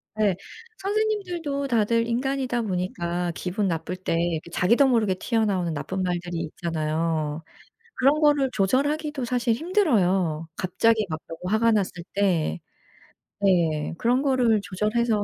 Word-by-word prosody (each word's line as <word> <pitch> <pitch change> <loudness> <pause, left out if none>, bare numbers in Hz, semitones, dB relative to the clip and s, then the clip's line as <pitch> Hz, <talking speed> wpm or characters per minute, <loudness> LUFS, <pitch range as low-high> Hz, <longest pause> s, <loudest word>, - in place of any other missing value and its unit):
네. 210 -4 +2 0.4
선생님들도 380 -9 -1
다들 230 -1 +2
인간이다 255 0 -1
보니까 180 -3 -2
기분 190 +4 -2
나쁠 165 +1 -2
때 185 -2 -2 0.3
그 170 - -13
자기도 235 +11 +4
모르게 220 -7 +2
튀어나오는 195 -6 0
나쁜 190 +5 -3
말들이 175 -2 -2
있잖아요. 160 -1 -2 0.5
그런 280 +4 +3
거를 290 -3 +4
조절하기도 285 +7 0
사실 240 -1 +1
힘들어요 195 - +1
갑자기 215 +4 +2
막 155 0 -3
너무 165 - -8
화가 230 +1 +3
났을 190 -4 -1
때. 175 - +1 0.8
네. 165 -6 +2
그런 245 +3 +2
거를 250 -6 +2
조절해서 215 +2 0
210 Hz, 300 characters per minute, -25 LUFS, 175-255 Hz, 0.8 s, 자기도